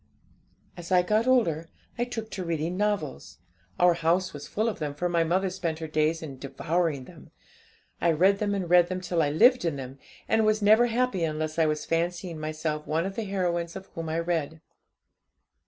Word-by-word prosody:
'As 175 0 -9
I 180 -1 +5
got 215 +5 +1
older, 170 -11 +2 0.3
I 240 - -1
took 225 -3 -6
to 190 - -4
reading 165 0 -2
novels. 155 - -2 0.4
Our 175 0 +6
house 175 +3 0
was 145 0 -8
full 215 +2 -1
of 225 - -3
them, 145 -2 -3
for 175 +4 -1
my 170 -1 +2
mother 185 +3 0
spent 170 -4 -3
her 160 - -5
days 155 +1 0
in 135 -4 -8
devouring 150 +2 -1
them. - - -15 0.7
I 170 - +4
read 190 +5 +3
them 205 -1 0
and 190 -3 -2
read 175 0 +5
them 185 0 -3
till 175 -2 0
I 145 - +2
lived 240 - +5
in 165 -4 0
them, 135 0 -8 0.3
and 220 0 +3
was 215 0 +3
never 215 +3 +5
happy 235 -6 0
unless 155 0 -2
I 160 - +4
was 150 0 -2
fancying 170 0 -2
myself 155 0 -3
one 160 +3 0
of 195 0 -4
the 225 - -3
heroines 175 -3 -2
of 190 0 -9
whom 165 -1 -5
I 160 - -1
read. 165 -2 -2
170 Hz, 200 wpm, -27 LUFS, 155-195 Hz, 0.7 s, Our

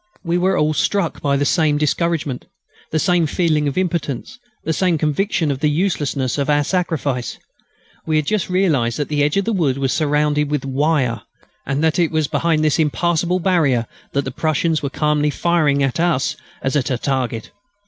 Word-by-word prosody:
We 170 0 0
were 190 +2 +2
all 150 +1 +2
struck 190 +1 0
by 140 -1 +1
the 145 - 0
same 155 -2 +2
discouragement, 150 -2 -1 0.4
the 155 - -1
same 175 0 +2
feeling 155 -2 +1
of 140 - -3
impotence, 175 - -2 0.2
the 160 - -1
same 180 -1 +1
conviction 155 +1 0
of 135 - -3
the 150 +1 +2
uselessness 145 -6 -1
of 140 - -1
our 145 0 +3
sacrifice. 145 - -2 0.7
We 155 - +1
had 155 -1 +2
just 210 +3 -1
realised 155 -11 +1
that 145 - -2
the 150 -1 0
edge 145 +5 +1
of 200 - +1
the 230 - 0
wood 150 -9 +1
was 135 -1 0
surrounded 150 -1 +1
with 145 -2 -1
wire, 135 -4 0 0.5
and 140 +3 -1
that 160 +2 +2
it 170 -2 +3
was 155 -2 0
behind 155 +1 +1
this 155 +1 +2
impassable 170 +3 +1
barrier 155 -10 +2 0.3
that 140 0 0
the - - -3
Prussians 160 0 0
were 140 - -2
calmly 150 +1 +1
firing 150 -3 +1
at 135 +3 -1
us 155 -3 +1 0.3
as 135 +2 -1
at 140 -4 +1
a 130 - 0
target. 125 -4 -2
150 Hz, 190 wpm, -19 LUFS, 140-170 Hz, 0.7 s, our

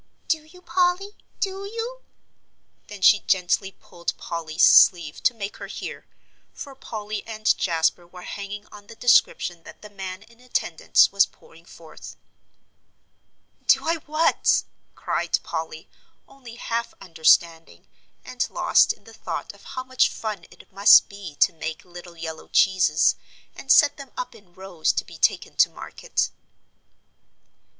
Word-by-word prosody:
"Do 315 -2 0
you, 360 +3 -18
Polly? 360 +3 0 0.3
Do 390 0 -3
you?" 460 +4 -6 0.9
then 205 -2 -10
she 205 - +7
gently 190 +1 0
pulled 170 -1 -6
Polly's 165 0 0
sleeve 165 -4 +5
to 255 - +3
make 200 -2 -6
her - - -8
hear, - - -8 0.5
for 280 - -9
Polly 215 -5 -6
and 215 -1 +1
Jasper 170 0 0
were 180 0 -13
hanging 205 +1 -7
on 205 -1 -14
the 225 - -12
description 180 -7 +2
that - - -15
the 210 - -11
man 190 -1 -7
in 230 +1 -22
attendance 245 -9 +2
was 200 0 +4
pouring 165 +1 -21
forth. 165 -2 -13 1.5
"Do - - +4
I 330 +1 +1
what?" 310 +2 +2 0.3
cried - - -1
Polly, 475 - -6 0.4
only 250 -4 -13
half 235 -1 -4
understanding, 165 -1 +1 0.4
and 255 -1 -3
lost - - +3
in - - -26
the - - -15
thought - - -6
of - - -20
how 255 - -2
much 260 0 +2
fun 210 -6 -6
it - - -18
must 200 +2 +7
be 200 -6 -10
to 180 - +3
make 160 -1 -6
little 175 -1 -12
yellow 160 -1 -7
cheeses, 180 -4 +3 0.4
and 270 - -3
set 290 -2 +6
them 275 -2 -10
up - - -5
in 180 -4 -20
rows 185 -4 -1
to - - -2
be - - -13
taken - - +1
to - - +5
market. - - -3
200 Hz, 145 wpm, -23 LUFS, 175-255 Hz, 1.5 s, she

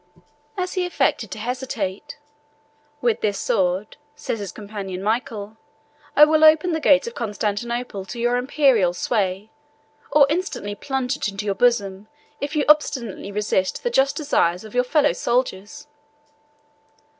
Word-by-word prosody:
As 365 -1 -2
he 370 - 0
affected 270 - 0
to - - -7
hesitate, 240 0 -4 0.8
"With 235 -3 +1
this 205 -2 0
sword," 185 +2 -1 0.2
said 230 - -4
his 200 -3 -5
companion 200 -3 -7
Michael, 215 -1 -2 0.6
"I 300 - +9
will 310 0 +2
open 315 +3 +6
the 320 - 0
gates 290 +1 +4
of 470 - -6
Constantinople 215 - -3
to 235 - -8
your 240 +1 +1
Imperial 250 -8 +2
sway; 200 0 -1 0.6
or 295 -2 +6
instantly 305 - -3
plunge 265 +3 -2
it - - -2
into 200 0 -5
your 200 - 0
bosom, 200 -3 +1 0.3
if 290 +2 -4
you 295 - +1
obstinately 265 -10 +1
resist 205 - -1
the 485 - -1
just 275 - +2
desires 185 - +1
of 215 - -11
your 250 0 +2
fellow 290 +4 +2
soldiers." 240 +1 -2
235 Hz, 145 wpm, -22 LUFS, 205-285 Hz, 0.8 s, I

